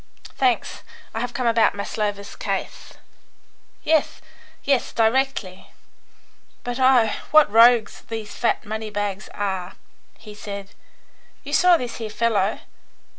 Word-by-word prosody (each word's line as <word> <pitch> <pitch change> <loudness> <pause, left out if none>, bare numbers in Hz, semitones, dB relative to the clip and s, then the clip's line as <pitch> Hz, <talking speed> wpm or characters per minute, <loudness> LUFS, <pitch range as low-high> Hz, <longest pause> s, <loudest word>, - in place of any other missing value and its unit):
"Thanks; 255 -3 0 0.3
I 225 - -3
have 245 +1 -4
come 255 - -2
about 230 -3 +3
Maslova's 200 0 -4
case." - - -5 0.9
"Yes, 315 -1 +1 0.4
yes; 275 -3 +1
directly! 225 -5 0 0.9
But 245 +1 -4
oh, 255 -4 +5 0.2
what 310 -7 +5
rogues 230 0 +5
these 220 -2 -6
fat 235 - 0
money 220 +1 -4
bags 205 -1 -4
are!" 190 -2 -3 0.4
he 210 - -12
said. 200 -1 -8 0.7
"You 290 0 -7
saw 360 +1 +5
this 245 -5 -5
here 225 -2 -5
fellow. 210 -2 0
225 Hz, 120 wpm, -22 LUFS, 205-245 Hz, 0.9 s, oh